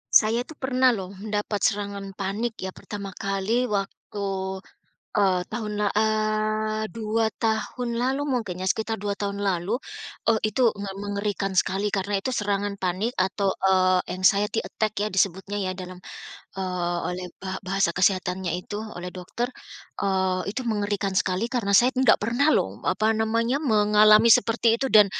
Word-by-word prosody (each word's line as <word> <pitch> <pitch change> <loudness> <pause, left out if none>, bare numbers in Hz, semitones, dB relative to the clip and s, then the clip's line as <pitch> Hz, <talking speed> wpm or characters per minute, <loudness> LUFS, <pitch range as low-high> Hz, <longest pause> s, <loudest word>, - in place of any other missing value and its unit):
Saya 230 +3 +4
tuh 315 - -11
pernah 260 -2 +2
loh 190 -2 -6
dapat 210 0 -2
serangan 200 -2 -2
panik 210 +4 -2
ya 190 - -3
pertama 200 0 -7
kali 195 +6 -1
waktu, 200 0 -4 0.9
eee, 190 -3 +3
tahun 215 -2 -4
la 205 - +2
eee, 215 0 0
2 220 0 0
tahun 230 +2 -1
lalu 260 +3 0
mungkin 220 -9 -2
ya, 185 - 0
sekitar 220 +1 -1
2 205 0 -2
tahun 200 0 -3
lalu, 195 +4 0 0.5
eee, 225 - +5 0.2
itu 245 +2 +4
me 200 -1 -5
mengerikan 200 -1 -2
sekali 195 +3 +2
karena 200 0 -1
itu 195 - -4
serangan 205 -4 -1
panik 195 +6 -2
atau, 190 +1 0
eee, 185 -1 +3 0.2
anxiety 205 +4 +3
attack 215 -2 -2
ya 210 - +1
disebutnya 190 0 0
ya, 185 - -1
dalam, 185 0 -8 0.6
eee, 180 -2 -1
oleh 180 0 -4
ba 190 0 -5
bahasa 195 -2 0
kesehatannya 185 -1 +1
itu 205 +3 -6 0.2
oleh 180 +1 -7
dokter, 185 +6 -3 0.6
eee, 190 -2 +1
itu 250 +4 -4
mengerikan 205 -3 -1
sekali 185 +3 +1
karena 240 -5 -2
saya 240 +6 +5
enggak 260 0 +4
pernah 240 +8 +2
loh, 95 - 0
apa 215 +4 +1
namanya, 230 +5 0
mengalami 215 -2 +5
seperti 230 0 +5
itu 270 +1 -1
dan 210 -2 +8
205 Hz, 150 wpm, -25 LUFS, 190-220 Hz, 0.9 s, dan